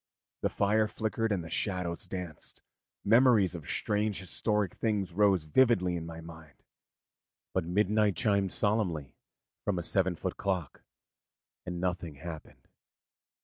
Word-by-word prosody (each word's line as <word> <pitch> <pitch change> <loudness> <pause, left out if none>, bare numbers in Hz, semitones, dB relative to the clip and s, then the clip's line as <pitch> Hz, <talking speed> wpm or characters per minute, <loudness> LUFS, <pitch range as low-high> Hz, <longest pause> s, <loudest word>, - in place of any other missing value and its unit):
The - - +1
fire 105 +2 +2
flickered 110 +1 -2
and 95 -4 0
the 85 - -8
shadows 90 -4 -1
danced, 90 -5 -7 0.4
memories 110 -4 +5
of 85 -4 -8
strange 105 -1 0
historic 105 +1 0
things 105 -5 -1
rose 100 -3 +3
vividly 90 0 +3
in 85 -1 -4
my 80 0 -8
mind; 80 -3 -13 0.9
but 95 -3 0
midnight 105 +2 +2
chimed 100 -3 +1
solemnly 90 - 0 0.5
from 100 -2 0
a 85 - -2
seven 95 0 +1
foot - - -4
clock, 90 -7 -2 0.9
and 90 -1 -3
nothing 90 -3 -2
happened. 80 +1 -9
95 Hz, 130 wpm, -30 LUFS, 85-105 Hz, 0.9 s, memories